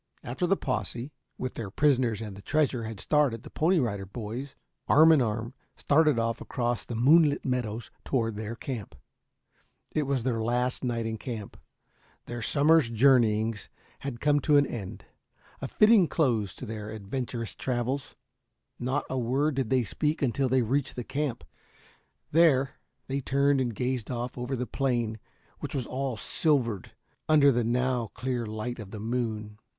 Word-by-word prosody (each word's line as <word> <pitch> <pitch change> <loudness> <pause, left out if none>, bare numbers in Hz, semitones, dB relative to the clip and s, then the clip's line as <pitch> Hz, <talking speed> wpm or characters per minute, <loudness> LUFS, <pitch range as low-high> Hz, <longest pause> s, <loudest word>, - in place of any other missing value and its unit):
After 135 +9 -2
the 195 +2 +3
posse, 130 0 -3 0.3
with 130 - -4
their 110 -4 -5
prisoners 125 -3 +2
and 105 -3 -6
the 100 - -11
treasure, 135 -3 0
had 110 -2 -6
started, 140 -7 +1
the - - -11
Pony 175 +4 +2
Rider 100 - -1
Boys, 120 +6 -6 0.3
arm 160 +2 +7
in 155 -4 +5
arm, 115 +1 -2 0.2
started 150 -2 +3
off 115 +1 -1
across 120 -1 -2
the 120 - -6
moonlit 145 +5 +4
meadows 120 -3 -2
toward 115 -5 0
their 110 +2 -5
camp. 115 - -6 1.0
It 150 -3 -1
was 135 -4 0
their 115 -3 0
last 125 +3 0
night 120 -2 -1
in 110 -1 -3
camp. 110 -5 -6 0.7
Their 120 0 -5
summer's 145 +2 +4
journeyings 115 -3 +3 0.3
had 135 -4 -5
come 145 +1 +3
to 145 +1 +4
an 145 - +5
end 105 -9 -7 0.6
a 135 - -3
fitting 215 - +5
close 115 - 0
to - - -7
their 105 -1 -6
adventurous 115 +2 -4
travels. 130 +2 -2 0.6
Not 130 +4 -1
a 130 - -2
word 135 +6 +1
did 130 -4 -1
they 130 -2 +3
speak 150 - -1
until 130 +1 +1
they 130 0 +3
reached 135 +4 -1
the 125 - -4
camp. 135 -1 -3 0.9
There, 145 -4 +4 0.3
they 135 +1 -2
turned 140 +1 +2
and 120 -4 -2
gazed 125 -1 -2
off 120 0 -3
over 125 +2 -3
the 125 0 -2
plain 120 -5 -1 0.4
which - - -5
was 130 -3 -1
all 130 -2 -3
silvered 120 - 0 0.4
under 145 -2 +6
the 120 -1 +1
now 125 0 0
clear 125 -3 -2
light 110 +3 -4
of 105 -3 -8
the 105 - -7
moon. 110 -2 -3
125 Hz, 165 wpm, -28 LUFS, 115-140 Hz, 1.0 s, arm